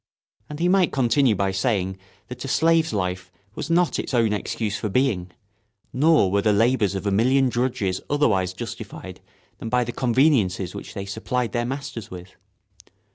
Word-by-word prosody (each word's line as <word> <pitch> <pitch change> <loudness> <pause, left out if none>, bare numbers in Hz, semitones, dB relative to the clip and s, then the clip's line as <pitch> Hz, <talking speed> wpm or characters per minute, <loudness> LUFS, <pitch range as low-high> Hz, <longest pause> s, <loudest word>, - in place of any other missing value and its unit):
And 150 - -7
he 175 - +2
might 185 -1 +3
continue 130 -2 +2
by 95 0 0
saying 95 -2 -1 0.3
that 125 -1 -8
a - - -5
slave's 160 +2 +2
life 90 -2 -3 0.2
was - - -6
not 175 0 +2
its - - -3
own 115 -3 +2
excuse 105 +1 -3
for 105 - -3
being, 100 -6 0 0.6
nor 150 - +3
were 100 +1 +2
the 105 - +2
labours 110 -2 +2
of 95 +1 -4
a 100 - +1
million 130 +6 +3
drudges 120 -7 -1
otherwise 110 -11 +1
justified - - -8 0.4
than 115 - -5
by 125 +1 +2
the 120 - -4
conveniences 115 - +1
which - - -9
they 100 - -4
supplied 115 +4 -2
their 120 -1 -1
masters 125 -5 -6
with. 90 0 -10
115 Hz, 170 wpm, -23 LUFS, 95-135 Hz, 0.6 s, might